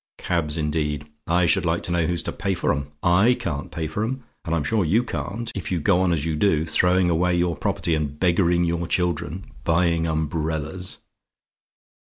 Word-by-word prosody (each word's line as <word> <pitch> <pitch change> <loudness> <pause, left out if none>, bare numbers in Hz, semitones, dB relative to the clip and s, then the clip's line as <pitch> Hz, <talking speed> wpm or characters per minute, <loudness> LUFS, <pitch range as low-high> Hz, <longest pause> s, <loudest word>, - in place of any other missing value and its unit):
Cabs, 85 -3 -1
indeed! 75 -1 -1 0.2
I 85 +1 +3
should 85 - +3
like 85 0 0
to - - -3
know 85 -2 +1
who's 85 -1 -1
to - - -3
pay 95 0 -2
for - - +1
'em; 70 +1 -4
I 95 +8 +5
can't 70 -12 -3
pay 80 - -4
for 80 +7 -2
'em, 130 +3 -3 0.2
and 85 -2 -1
I'm 80 - 0
sure 110 +6 +1
you 105 +9 +2
can't, 120 -1 -4
if 95 -4 -5
you 90 - +1
go 90 +4 +3
on 95 -2 +2
as 80 -3 0
you 80 -2 -1
do; 80 -2 +2
throwing 90 +3 +3
away 90 +2 +2
your 85 -1 +1
property, 85 - -1
and 75 -2 -2
beggaring 85 -1 +3
your 85 0 -1
children 85 0 -1 0.2
buying 85 0 +2
umbrellas! 80 +2 -2
85 Hz, 195 wpm, -23 LUFS, 80-90 Hz, 0.2 s, I